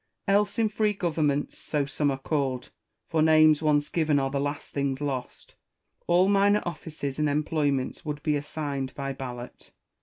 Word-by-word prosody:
Else 205 +1 +2
in 225 -1 +3
free 210 0 +1
governments, 155 -6 -1
so 145 -2 -1
some 145 +1 0
are 135 - -1
called 135 -2 -2 0.4
(for 160 -1 +1
names 155 -1 +6
once 150 -1 +2
given 155 -3 +2
are 135 -1 0
the 140 - -1
last 145 +1 -4
things 140 -2 -1
lost), 135 -4 -5 0.5
all 175 +2 +4
minor 205 +1 +4
offices 155 -5 -5
and 150 -1 +2
employments 145 -2 0
would 150 -1 -5
be 150 - +1
assigned 145 -2 -4
by 135 -1 -3
ballot. 125 -2 -8
150 Hz, 160 wpm, -27 LUFS, 140-160 Hz, 0.5 s, names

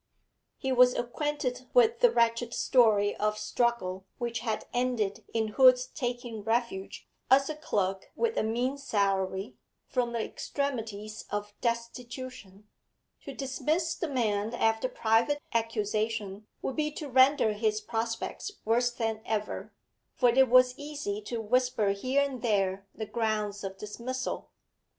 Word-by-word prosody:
He 265 - -2
was 250 -1 +6
acquainted 255 0 -2
with 465 -1 +5
the - - +6
wretched 235 - +1
story 215 -5 +4
of 210 0 0
struggle 215 -4 -1
which 235 -1 -2
had 220 -3 -2
ended 225 -4 0
in 220 -1 0
Hood's 255 +2 +6
taking 245 -5 -4
refuge, 225 -3 -2 0.2
as 275 +3 +5
a - - -5
clerk 195 -11 -2
with 465 -1 0
a - - +2
mean 245 +5 -1
salary, 195 -3 -1 0.3
from 245 -2 -1
the 230 -2 -1
extremities 220 -7 -4
of 205 0 -4
destitution. 235 -3 -5 0.6
To 275 - -6
dismiss 305 +5 -1
the 335 - -3
man 225 -5 0
after 225 +2 +1
private 230 +7 +2
accusation 215 -2 -1 0.2
would 265 - -3
be 300 -1 +1
to 300 -1 -6
render 260 -3 +5
his 215 0 0
prospects 225 - -3
worse 240 +2 +3
than 225 -2 -2
ever, 215 -2 -3 0.4
for 245 - +4
it 260 +1 +5
was 255 0 +6
easy 285 -9 -4
to 235 - -3
whisper 245 -1 +1
here 255 +8 +1
and 270 -4 -4
there 195 -4 0
the 220 - -4
grounds 210 -2 -1
of 195 0 -5
dismissal. 235 +6 -4
235 Hz, 135 wpm, -29 LUFS, 215-255 Hz, 0.6 s, was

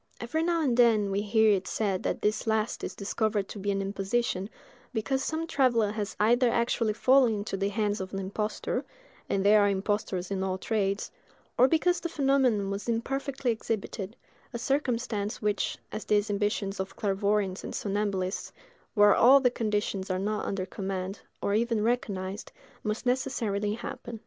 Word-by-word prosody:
Every 240 +7 -1
now 335 -1 +1
and 255 -5 +2
then 225 -5 +4
we 195 +1 0
hear 220 +1 +4
it 190 -2 +1
said 195 -4 -1
that - - -2
this 215 +2 0
last 220 0 0
is - - -4
discovered 210 0 -1
to 210 - -7
be 200 +1 -2
an 195 0 0
imposition, 195 0 -1 0.5
because 265 +5 0
some 320 +1 -2
traveller 240 -9 +2
has 210 -1 -4
either 240 +4 +4
actually 235 -2 +1
fallen 255 0 +4
into 205 -1 -3
the 195 +1 0
hands 205 -1 -1
of 185 - -6
an 195 - -4
impostor—and 205 - -4
there 210 +1 +7
are 205 - +4
impostors 195 -2 -1
in 195 -1 -1
all 190 -1 -1
trades—or 205 +4 -1
because 345 +5 +2
the 340 - -4
phenomenon 265 -9 +2
was 200 +4 -4
imperfectly 270 +2 -1
exhibited; 220 -2 -4 0.4
a 240 - -4
circumstance 235 -5 -1
which, 210 -1 -1
as 215 -1 -5
in - - -35
the - - +6
exhibitions 205 -1 -1
of 190 0 -4
clairvoyants 200 -1 0
and - - -5
somnambulists, 200 -2 -2 0.4
where 205 -1 +7
all 265 +4 +7
the 250 -2 +3
conditions 205 -4 -1
are 185 - 0
not 210 +3 -2
under 190 -2 -2
command, 190 0 -4 0.2
or 200 - +1
even 225 0 +1
recognised, 205 -4 -2 0.3
must 215 +4 -3
necessarily 225 -5 0
happen. 235 0 -7
210 Hz, 165 wpm, -28 LUFS, 200-235 Hz, 0.5 s, there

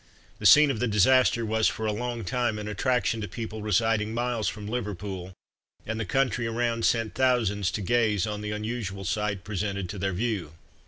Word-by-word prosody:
The - - +4
scene 150 -1 +8
of 115 - -4
the 125 - +1
disaster 115 +3 +4
was 110 0 +2
for 110 - -2
a 110 - +1
long 120 0 -3
time 120 +3 0
an 105 0 -5
attraction 115 +1 0
to 105 - -3
people 110 -1 -6
residing 110 +1 +1
miles 120 -2 -1
from 105 -1 -4
Liverpool, 100 -5 -4 0.5
and 110 +1 -3
the 110 - -2
country 125 +3 0
around 115 0 0
sent 115 -2 +1
thousands 115 -7 +1
to 105 - -3
gaze 110 -2 +2
on 105 -1 -4
the 105 - -4
unusual 105 -2 -4
sight 100 0 -1
presented 100 -2 -3
to 100 - -6
their 95 0 -1
view. 95 -6 -2
110 Hz, 190 wpm, -27 LUFS, 105-120 Hz, 0.5 s, scene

